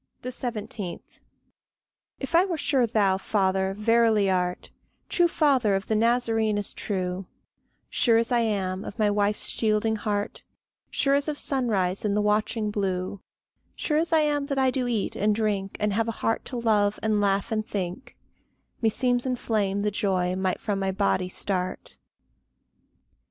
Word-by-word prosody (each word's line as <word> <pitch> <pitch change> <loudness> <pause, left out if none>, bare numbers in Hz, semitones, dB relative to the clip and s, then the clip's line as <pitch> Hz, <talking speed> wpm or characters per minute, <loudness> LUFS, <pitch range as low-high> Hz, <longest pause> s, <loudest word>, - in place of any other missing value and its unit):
17. 220 -7 -4 1.2
If 270 +4 -6
I 340 +2 +6
were 365 -4 -2
sure 265 -5 +2
thou, 200 -4 +2
Father, 190 -1 0
verily 220 -2 +3
art, 180 -1 -1 0.4
True 350 -1 +3
father 265 -11 +2
of 195 - -3
the 220 - +1
Nazarene 225 -1 +2
as 205 - -2
true, 185 -2 -3 0.6
Sure 230 -2 +3
as 230 +1 0
I 240 - +4
am 195 -4 -1
of - - -8
my 210 -2 +2
wife's 205 0 +1
shielding 220 0 +1
heart, 205 -1 -3 0.5
Sure 275 - +1
as 280 +1 +2
of 300 -1 -2
sunrise 215 -10 0
in 205 -1 0
the 210 - +2
watching 210 +1 0
blue, 190 -1 -2 0.5
Sure 300 -1 0
as 335 +1 -1
I 320 -1 +5
am 290 -2 0
that 275 -2 -2
I 265 -1 +3
do 255 -2 -1
eat 230 -4 -1
and 210 +1 +2
drink, 205 -3 -1
And 210 -1 0
have 225 +2 +1
a - - 0
heart 225 - 0
to 250 - -5
love 210 -3 +2
and 215 -1 +2
laugh 195 0 +1
and 215 -1 0
think, 190 +2 -5 0.6
Meseems 245 +2 +1
in 255 - 0
flame 205 -4 -1
the 210 0 0
joy 185 -3 0
might 190 -1 -1
from 205 -3 -2
my 195 0 0
body 190 -2 0
start. 185 -1 -3
210 Hz, 160 wpm, -26 LUFS, 195-240 Hz, 1.2 s, I